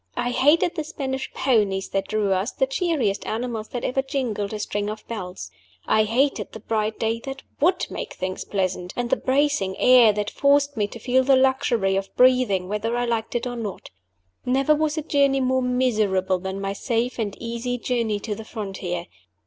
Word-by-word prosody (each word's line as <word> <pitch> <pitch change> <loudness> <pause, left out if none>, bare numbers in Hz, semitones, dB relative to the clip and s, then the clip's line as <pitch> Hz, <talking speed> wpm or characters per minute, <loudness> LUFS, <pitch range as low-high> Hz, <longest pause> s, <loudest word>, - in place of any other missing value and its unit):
I 245 - 0
hated 295 +7 +3
the 320 -3 -3
Spanish 270 -4 -4
ponies 205 -7 +1
that 195 0 -1
drew 210 -2 +1
us, 190 +6 -1
the 265 - +1
cheeriest 270 - 0
animals 225 -1 -3
that 245 - -5
ever 270 +2 +1
jingled 250 -7 -2
a 215 - -3
string 205 0 -2
of 215 0 -7
bells. 185 -5 -6 0.3
I 215 0 +3
hated 265 +6 0
the 220 - -7
bright 215 0 -1
day 225 0 -1
that 270 0 -6 0.2
would 355 +4 +2
make - - -5
things 185 0 -4
pleasant, 185 -2 -2
and 240 -1 -2
the - - +5
bracing 265 -8 +1
air 250 -3 +7
that 210 0 -2
forced 285 0 +3
me 210 -2 0
to 220 - -9
feel 250 +3 +2
the 270 +1 +5
luxury 255 -7 +2
of 195 0 -2
breathing 250 -8 +4
whether 215 +4 -1
I 245 - 0
liked 230 -1 -2
it 240 - 0
or 245 -1 -3
not. 215 -5 -6 0.5
Never 270 +4 +3
was 305 +1 0
a 310 - -1
journey 280 -2 +2
more 260 0 +1
miserable 215 -7 +1
than 190 +1 -4
my 195 0 -2
safe 235 +4 -1
and 205 -3 -2
easy 235 +1 -3
journey 230 -4 -1
to 215 - -3
the 220 - -7
frontier. 190 -6 -5
235 Hz, 190 wpm, -24 LUFS, 205-265 Hz, 0.5 s, air